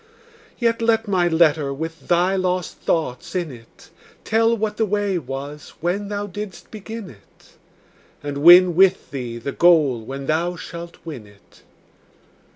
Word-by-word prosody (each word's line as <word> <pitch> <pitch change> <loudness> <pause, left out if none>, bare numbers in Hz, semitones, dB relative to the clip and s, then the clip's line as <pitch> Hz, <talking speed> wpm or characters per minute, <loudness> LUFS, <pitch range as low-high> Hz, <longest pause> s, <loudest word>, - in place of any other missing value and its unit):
Yet 230 -1 0
let 225 -1 +2
my 185 -3 +2
letter 160 -4 +2
with 160 +4 -6
thy 180 +2 +2
lost 185 -1 -1
thoughts 165 +1 -2
in 175 -5 -2
it 115 -2 -16 0.3
Tell 225 +1 +2
what 210 -1 -2
the 225 - +2
way 205 -2 0
was 140 +1 -8
when 185 +5 -2
thou 205 0 -3
didst 205 -1 -8
begin 220 0 -8
it, 100 -5 -22 0.7
And 145 -1 -4
win 175 +3 +8
with 190 0 +3
thee 125 -4 -5
the 125 +4 -5
goal 155 -9 +4
when 135 +4 -7
thou 170 +4 0
shalt 170 0 -9
win 135 -10 -8
it. 100 -1 -22
175 Hz, 150 wpm, -21 LUFS, 145-200 Hz, 0.7 s, win